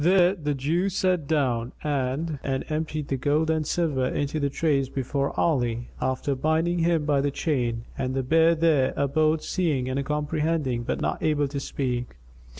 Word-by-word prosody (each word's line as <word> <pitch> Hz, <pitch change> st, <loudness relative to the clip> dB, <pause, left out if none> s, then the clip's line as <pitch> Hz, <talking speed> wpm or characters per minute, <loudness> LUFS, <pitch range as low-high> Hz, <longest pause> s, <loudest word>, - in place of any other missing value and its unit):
There 180 Hz, +1 st, +5 dB
the 150 Hz, -6 st, -2 dB
Jew 165 Hz, +8 st, 0 dB
sat 185 Hz, -5 st, 0 dB
down 130 Hz, -5 st, 0 dB
and 145 Hz, +1 st, -1 dB
emptied 155 Hz, +2 st, -2 dB
the 135 Hz, -, 0 dB
gold 150 Hz, +4 st, +1 dB
and 155 Hz, -2 st, 0 dB
silver 150 Hz, -8 st, 0 dB
into 145 Hz, +3 st, -1 dB
the 140 Hz, -1 st, 0 dB
trays 140 Hz, -2 st, +1 dB
before 140 Hz, +1 st, -1 dB
Ali, 120 Hz, -7 st, 0 dB
after 130 Hz, +2 st, 0 dB
binding 160 Hz, +5 st, +1 dB
him 165 Hz, -2 st, +2 dB
by 145 Hz, -2 st, +2 dB
the 145 Hz, -, +1 dB
chain; 120 Hz, -6 st, -1 dB
and 130 Hz, 0 st, -1 dB
the 135 Hz, -, 0 dB
bear 165 Hz, +5 st, +4 dB
there 155 Hz, -5 st, +2 dB
abode 155 Hz, +3 st, +2 dB
seeing 150 Hz, -9 st, 0 dB
and 135 Hz, +2 st, -1 dB
comprehending 150 Hz, -3 st, -1 dB
but 120 Hz, -, -3 dB
not -, -, -1 dB
able 150 Hz, -2 st, +1 dB
to 140 Hz, 0 st, -3 dB
speak. 125 Hz, -, -3 dB
145 Hz, 165 wpm, -25 LUFS, 130-160 Hz, -, There